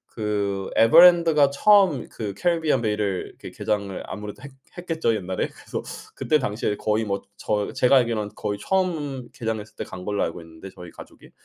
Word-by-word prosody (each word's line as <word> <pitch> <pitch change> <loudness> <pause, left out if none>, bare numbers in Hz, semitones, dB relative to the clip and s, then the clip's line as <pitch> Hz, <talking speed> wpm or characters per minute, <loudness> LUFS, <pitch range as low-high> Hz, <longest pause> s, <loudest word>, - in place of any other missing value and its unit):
그 100 -3 -2
에버랜드가 165 +2 +6
처음 185 - +4
그 105 -3 -6
캐리비안 160 -7 +1
베이를 105 -4 -2
그 - - -10
개장을 100 -3 -3
아무래도 105 +4 -8
했 140 - -8 0.3
했겠죠 165 -8 -1
옛날에? 95 -3 -3
그래서 - - -7 0.3
그때 155 - +1
당시에 105 -4 -2
거의 110 +1 0
뭐 100 -2 -2
저 105 -1 -2
제가 130 +2 +4
알기로는 115 -4 0
거의 100 0 -4
처음 150 - -2
개장했을 110 -2 -5
때 - - -5
간 90 - -9
걸로 100 -1 -1
알고 85 - -4
있는데 80 +3 -12
저희 90 -1 -11
가족이. - - -14
110 Hz, 370 characters per minute, -24 LUFS, 100-150 Hz, 0.3 s, 에버랜드가